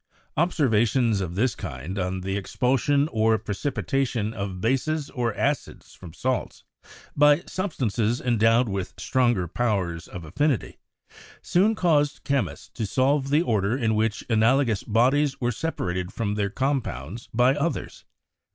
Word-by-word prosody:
Observations 120 - +2
of 90 -2 -4
this 115 +3 +1
kind 80 +5 -6
on 90 0 -2
the 95 +1 -3
expulsion 135 +7 +1
or 110 0 +3
precipitation 120 0 -2
of 100 -3 -5
bases 140 +7 -1
or 120 -2 -1
acids 145 +2 -2
from 90 -3 -11
salts, 130 +9 -3 0.5
by 150 +3 +5
substances 120 - -1
endowed 115 0 +3
with 95 -2 -4
stronger 120 -8 +1
powers 95 -6 -1
of 85 -3 -8
affinity, 130 - -1 0.6
soon 205 +5 +3
caused 150 -7 +1
chemists 140 -2 -2
to 110 -3 -4
solve 135 +4 +1
the 150 +4 +3
order 110 - +1
in 115 -4 +1
which 110 0 0
analogous 115 0 +2
bodies 135 +5 +2
were 120 -1 0
separated 95 - -3
from 105 -3 -2
their 105 -1 -1
compounds 115 - -3
by 125 +3 +4
others. 150 +4 -3
120 Hz, 135 wpm, -25 LUFS, 100-140 Hz, 0.6 s, by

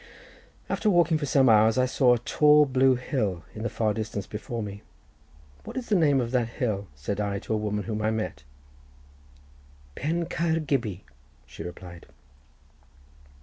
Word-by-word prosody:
After 215 - 0
walking 170 -4 +3
for 145 - -3
some 135 -1 +4
hours 110 0 +5
I 130 - +4
saw 125 -1 +3
a 120 - -8
tall 150 0 +5
blue 130 -1 +3
hill 105 - -2
in 110 - -8
the 115 - -2
far 110 -2 0
distance 105 -2 -4
before 110 +2 -5
me. 100 0 -7 0.8
"What - - -8
is 255 - -5
the 210 - +3
name 145 -6 +3
of 120 -2 -2
that 125 -3 +1
hill?" 105 -5 -2
said 75 +9 -4
I 100 -1 -2
to 105 - -4
a - - +1
woman 105 -1 -2
whom 110 -1 -3
I 110 - +1
met. 110 -9 -3 1.5
"Pen 165 - -2
Caer 165 0 0
Gybi," 120 - -2 0.4
she - - -11
replied. 90 -1 -9
115 Hz, 165 wpm, -26 LUFS, 105-140 Hz, 1.5 s, hours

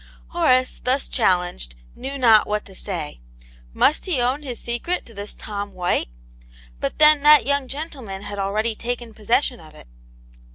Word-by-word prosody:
Horace 255 -7 +2
thus 260 +2 +1
challenged, 180 - 0 0.2
knew 270 +2 -6
not 225 -5 +5
what 210 0 -2
to 195 - -13
say. 175 - -5 0.5
Must 285 - +2
he 335 -8 +1
own 255 +4 +1
his 250 -6 -6
secret 240 +10 -2
to 230 - -14
this 205 0 -7
Tom 205 -1 -6
White 180 - 0 0.4
} - - -24
But - - -2
then 305 -1 +6
that 295 -4 +7
young 280 -1 0
gentleman 265 -9 -6
had 205 0 -6
already 215 +4 0
taken 235 0 -4
pos 210 -1 -16
session 245 +1 +2
of 155 -2 -15
it. - - -14
230 Hz, 170 wpm, -22 LUFS, 195-270 Hz, 0.5 s, that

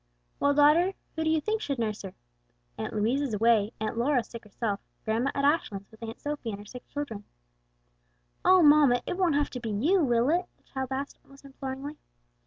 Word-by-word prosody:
"Well, 285 0 +3
daughter, 315 +6 +5 0.2
who 320 - -1
do 315 - +1
you 320 0 +3
think 435 +7 -1
should 280 -8 -2
nurse 215 -2 -2
her? 195 -2 -8 0.6
Aunt - - -4
Louise 230 +7 +1
is 265 -7 -1
away, 220 -1 +3
Aunt 220 +2 -2
Lora 250 0 +2
sick 230 -1 -11
herself, 210 0 -3 0.3
grandma 225 +5 +1
at 280 - +1
Ashlands 210 -10 0
with 220 - -18
Aunt 230 0 -7
Sophie 290 -5 -4
and 200 - -4
her 205 - -11
sick 250 +4 -11
children." 260 -8 -5 1.2
"Oh, 370 -2 +6
mamma, 290 -5 +6
it - - -2
won't 355 -5 +2
have 290 0 +1
to 250 - -5
be 235 -2 -5
you, 310 - +2
will 240 +1 +2
it?" 355 +2 +1
the - - -36
child 265 -1 -4
asked 275 +2 -4
almost 275 0 -18
imploringly. 275 +2 -7
265 Hz, 200 wpm, -28 LUFS, 225-295 Hz, 1.2 s, Oh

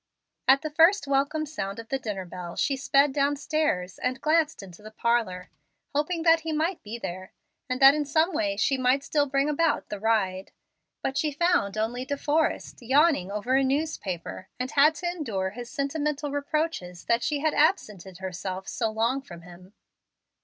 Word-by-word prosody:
At 270 +2 +5
the 310 - -3
first 330 +3 +4
welcome 280 +3 0
sound 200 -10 -5
of 230 0 -9
the 270 - -1
dinner 205 -6 -4
bell 175 -1 -8
she 275 - +1
sped 275 +1 +3
downstairs, 285 -9 0
and 255 +1 -2
glanced 310 -4 +1
into 180 0 -13
the 215 - -10
parlor, 220 -5 -1 0.4
hoping 325 +4 -1
that 330 0 +5
he 320 0 -4
might 325 +4 -1
be 220 +3 -7
there, 185 -3 -7 0.4
and 255 0 -1
that 270 +1 +10
in 300 0 -1
some 315 +5 +2
way 300 -1 -1
she 270 -1 +1
might 255 +2 +2
still 290 -1 +1
bring 275 +1 +1
about 300 +1 0
the 205 - -5
ride. 195 -4 0 0.5
But 265 - -1
she 310 -2 0
found 295 - +1
only 235 +3 -1
De 285 +2 -3
Forrest 305 +3 -1
yawning 270 - +3
over 210 +5 -2
a 270 - +4
newspaper, 260 - -3
and 255 +1 -3
had 300 +3 +5
to 355 - -7
endure 225 - -2
his 240 +2 -8
sentimental 290 0 -2
reproaches 285 - -3
that 235 0 +2
she 290 +1 -1
had 310 -1 +1
absented 210 - 0
herself 185 +1 -5
so 225 -2 -1
long 230 +5 0
from 175 -10 -12
him. 180 +2 -14
270 Hz, 180 wpm, -26 LUFS, 205-300 Hz, 0.5 s, that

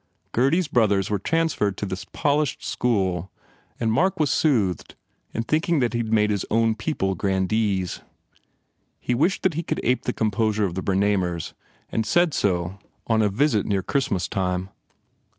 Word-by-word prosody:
Gurdy 135 +7 +3
s 185 -4 0
brothers 105 -7 +2
were 105 - +1
transferred 150 - 0
to - - -3
this 95 -1 -5
polished 145 -1 0
school 95 -7 0 0.5
and 115 -2 +1
Mark 175 +11 +1
was 150 -3 +2
soothed, 110 - +1 0.4
in 115 - -2
thinking 160 +6 +1
that 120 -2 +1
he 120 - 0
d 110 - -4
made 105 -1 +3
his 100 -2 -1
own 115 0 +3
people 110 -4 -1
grandees. 95 +1 0 1.0
He 125 - -1
wished 160 +10 +1
that 185 - +2
he 165 - -2
could - - -3
ape 125 +2 +1
the - - +1
composure 110 -1 +1
of 90 - -3
the 95 - -3
Bernamers 95 -4 0 0.4
and 110 - 0
said 175 +7 +2
so 90 0 0 0.3
on 110 -1 +2
a 105 - +3
visit 110 0 +1
near 100 -2 0
Christmas 95 -6 0
time. 90 -1 -2
110 Hz, 170 wpm, -24 LUFS, 95-130 Hz, 1.0 s, Gurdy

